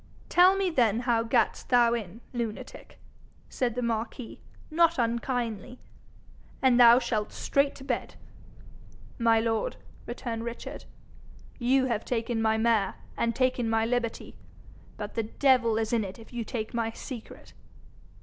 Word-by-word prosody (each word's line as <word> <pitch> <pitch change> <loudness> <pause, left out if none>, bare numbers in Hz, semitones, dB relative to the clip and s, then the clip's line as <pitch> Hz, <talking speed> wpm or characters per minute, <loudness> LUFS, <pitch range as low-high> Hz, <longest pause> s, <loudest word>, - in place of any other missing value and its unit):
'Tell 365 +2 +6
me 385 -2 0
then 235 -6 +2
how 240 -2 +2
gat'st 230 0 0
thou 240 -1 +5
in, 225 -1 -5
lunatic,' 230 -3 -6 0.5
said 240 -3 -1
the 250 - -2
marquis, 230 +1 -4 0.3
not 335 +1 +3
unkindly, 235 -1 -2 0.8
'and 255 -2 +4
thou 235 0 +9
shalt 225 -4 -1
straight 280 0 0
to 270 - -11
bed.' - - -3 1.0
'My 230 -1 +4
lord,' 225 -1 -1 0.3
returned 235 -2 -4
Richard, 235 0 -7 0.7
'you 260 +2 +3
have 230 -4 -1
taken 230 -1 -2
my 220 0 +2
mare, 220 -3 +2 0.2
and 230 -1 0
taken 255 -2 +1
my 225 0 +2
liberty, 235 -1 -2 0.6
but 210 -1 -6
the 230 - 0 0.2
devil 250 -5 +4
is 225 +1 -1
in 230 -2 +2
it 190 -1 -7
if 225 +1 -15
you 240 -1 -3
take 220 0 -5
my 230 -1 0
secret.' 230 0 -9
235 Hz, 140 wpm, -28 LUFS, 225-250 Hz, 1.0 s, thou